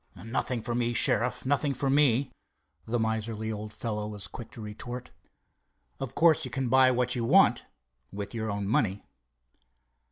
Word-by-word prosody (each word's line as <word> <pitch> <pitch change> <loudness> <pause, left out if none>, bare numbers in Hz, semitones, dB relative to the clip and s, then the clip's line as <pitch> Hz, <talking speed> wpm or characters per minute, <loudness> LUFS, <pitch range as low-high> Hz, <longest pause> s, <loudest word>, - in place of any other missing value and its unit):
"Nothing 115 0 -2
for 120 - -3
me, 120 0 0
Sheriff, 120 +3 +2
nothing 140 +1 +1
for 135 +2 -2
me," 135 -2 +3 0.6
the 120 +2 0
miserly 110 0 -2
old 105 0 -6
fellow 105 -2 -4
was 105 -2 -4
quick 115 - -9
to - - -11
retort. 120 +4 -7 0.9
"Of 135 - -5
course 160 -1 +4
you 130 - -4
can 130 +1 -2
buy 130 0 +6
what 125 0 +1
you 120 - -1
want—with 65 - 0
your 110 -1 -3
own 100 -1 -3
money." 100 -2 +1
115 Hz, 155 wpm, -28 LUFS, 105-130 Hz, 0.9 s, buy